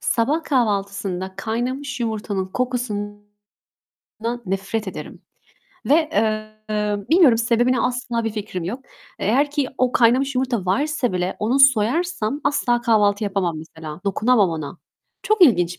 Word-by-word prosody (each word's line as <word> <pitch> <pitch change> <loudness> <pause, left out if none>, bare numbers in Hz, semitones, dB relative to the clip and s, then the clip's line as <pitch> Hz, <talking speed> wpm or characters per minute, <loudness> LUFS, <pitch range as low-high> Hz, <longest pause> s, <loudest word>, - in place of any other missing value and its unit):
Sabah 285 +8 0
kahvaltısında 200 - -1
kaynamış 255 +6 -3
yumurtanın 210 -4 -2
kokusundan 205 -4 -4 0.9
nefret 195 +2 -2
ederim - - -8 0.6
ve, 290 - +5 0.2
eee, 215 -1 -1
bilmiyorum 315 -10 +6
sebebini 240 +1 +2
asla 245 -2 -1
bir 225 - -1
fikrim 205 -5 -5
yok. 240 +10 -5 0.3
Eğer 270 +8 +2
ki 290 -3 -1
o 255 -1 +2
kaynamış 255 +3 +3
yumurta 250 -6 -1
varsa 275 - 0
bile 180 0 -2
onu 230 +6 +1
soyarsam 275 +2 +2
asla 245 -4 +1
kahvaltı 210 -3 +2
yapamam 190 -5 -1
mesela. 160 0 -9
Dokunamam 205 0 +3
ona. 160 +1 -6 0.4
Çok 430 -3 +2
ilginç. 180 - +4
220 Hz, 120 wpm, -21 LUFS, 200-255 Hz, 0.9 s, bilmiyorum